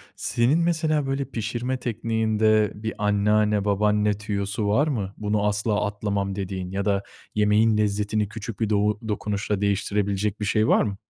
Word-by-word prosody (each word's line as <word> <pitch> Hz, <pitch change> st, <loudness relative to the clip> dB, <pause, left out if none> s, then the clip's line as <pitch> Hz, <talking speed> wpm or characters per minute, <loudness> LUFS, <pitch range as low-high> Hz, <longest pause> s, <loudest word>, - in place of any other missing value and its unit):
Senin 125 Hz, +7 st, +1 dB
mesela 155 Hz, -4 st, +1 dB
böyle 135 Hz, 0 st, -1 dB
pişirme 120 Hz, +3 st, -3 dB
tekniğinde 110 Hz, -2 st, +1 dB
bir 110 Hz, +1 st, -4 dB
anneanne, 105 Hz, 0 st, +2 dB
babaanne 105 Hz, +1 st, +2 dB
tüyosu 105 Hz, 0 st, -3 dB
var 135 Hz, +10 st, +3 dB
mı? 100 Hz, -9 st, -2 dB
Bunu 105 Hz, -1 st, 0 dB
asla 105 Hz, 0 st, 0 dB
atlamam 100 Hz, -1 st, -2 dB
dediğin 95 Hz, -2 st, -4 dB
ya 100 Hz, +1 st, -2 dB
da 100 Hz, -1 st, +1 dB, 0.3 s
yemeğin 105 Hz, +1 st, +3 dB
lezzetini 105 Hz, 0 st, 0 dB
küçük 110 Hz, -2 st, -7 dB
bir 110 Hz, -, 0 dB
dou 105 Hz, 0 st, +1 dB
dokunuşla 105 Hz, -1 st, -2 dB
değiştirebilecek 100 Hz, 0 st, 0 dB
bir 105 Hz, -, -2 dB
şey 110 Hz, +2 st, +2 dB
var -, -, +4 dB
mı? 100 Hz, -2 st, -3 dB
105 Hz, 150 wpm, -24 LUFS, 100-110 Hz, 0.3 s, var